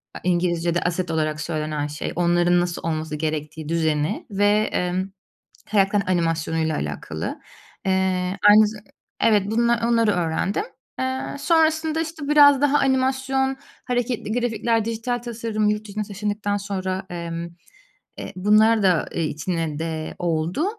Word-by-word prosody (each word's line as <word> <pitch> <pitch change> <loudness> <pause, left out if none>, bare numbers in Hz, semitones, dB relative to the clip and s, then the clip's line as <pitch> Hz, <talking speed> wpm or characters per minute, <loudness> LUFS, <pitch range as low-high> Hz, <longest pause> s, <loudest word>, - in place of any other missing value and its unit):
a - - -6
İngilizce'de 175 -1 +1
asset 175 0 -1
olarak 155 -1 -1
söylenen 155 -2 -2
şey. 150 +1 -5
Onların 175 0 +3
nasıl 175 -1 -3
olması 155 -1 -2
gerektiği, 155 0 -4
düzeni 160 +2 0
ve, 205 +2 +2
emm, 180 +2 -1 0.6
karakterin 200 -1 +2
animasyonuyla 165 -2 0
alakalı. 75 0 -4 0.5
Eee, 190 0 0
aynı 210 0 +7
za 215 0 -8 0.4
Evet 210 -3 +4
bunlar, 235 0 +2
onları 230 -2 +3
öğrendim. 175 - -1 0.4
Eee, 260 0 -1 0.2
sonrasında, 320 -1 +2
işte, 315 -3 -5
biraz 285 -2 +7
daha 290 0 +4
animasyon, 265 0 +1 0.3
hareketli 245 -3 -2
grafikler, 230 -1 0
dijital 230 +2 -2
tasarım. 225 -3 -2
Yurt 210 0 -2
dışına 210 +1 -3
taşındıktan 205 0 -2
sonra, 190 -1 -3
emm, 170 -1 -5 0.7
eee, - - -6
bunlar 215 +3 +4
da, 180 -4 +2
eee, 165 - -1
içine 155 0 -2
de 160 -1 -4
oldu. 170 - -1
195 Hz, 130 wpm, -23 LUFS, 165-230 Hz, 0.7 s, aynı